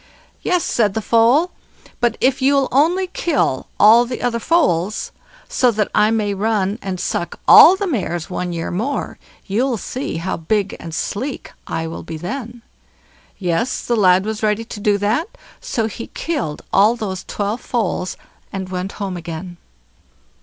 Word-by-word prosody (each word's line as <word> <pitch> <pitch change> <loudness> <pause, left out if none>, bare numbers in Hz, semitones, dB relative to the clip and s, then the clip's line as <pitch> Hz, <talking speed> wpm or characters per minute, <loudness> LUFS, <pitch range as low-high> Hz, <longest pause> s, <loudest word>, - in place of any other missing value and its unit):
"Yes", 360 -2 +1
said 210 -4 +1
the - - +1
foal; 240 - +4 0.5
"but 240 -2 +1
if 260 +1 +2
you'll 275 0 +3
only 335 +8 +3
kill 330 - -1
all 225 +3 +7
the 245 +1 -5
other 235 -1 0
foals, 215 - +1 0.4
so 250 - +2
that 215 -3 -1
I 210 0 +4
may 215 -2 0
run 205 0 0
and 190 -2 -4
suck 175 -1 -3
all 360 - +10
the 400 +1 -2
mares 175 - -2
one 180 -1 -3
year 165 -1 -3
more, 230 +11 -3 0.3
you'll 235 +5 0
see 255 - -4
how 170 +3 -3
big 200 +4 -1
and 165 -1 -7
sleek 260 - -4 0.2
I'll 165 0 -4
be 160 - -7
then." 235 - -6 0.7
Yes! 195 +7 -1
the 240 - +1
lad 190 -2 +4
was 220 0 -3
ready 215 +1 0
to 220 - -8
do 205 0 +2
that; 225 - -1 0.2
so 250 - -2
he 225 +1 -6
killed 165 - -4
all 210 +4 +5
those 195 -5 -4
twelve 210 +3 -3
foals, 210 -6 -2 0.3
and 190 -1 -5
went 185 +1 -4
home 195 -3 -4
again. 175 +1 -7
215 Hz, 160 wpm, -19 LUFS, 185-245 Hz, 0.7 s, all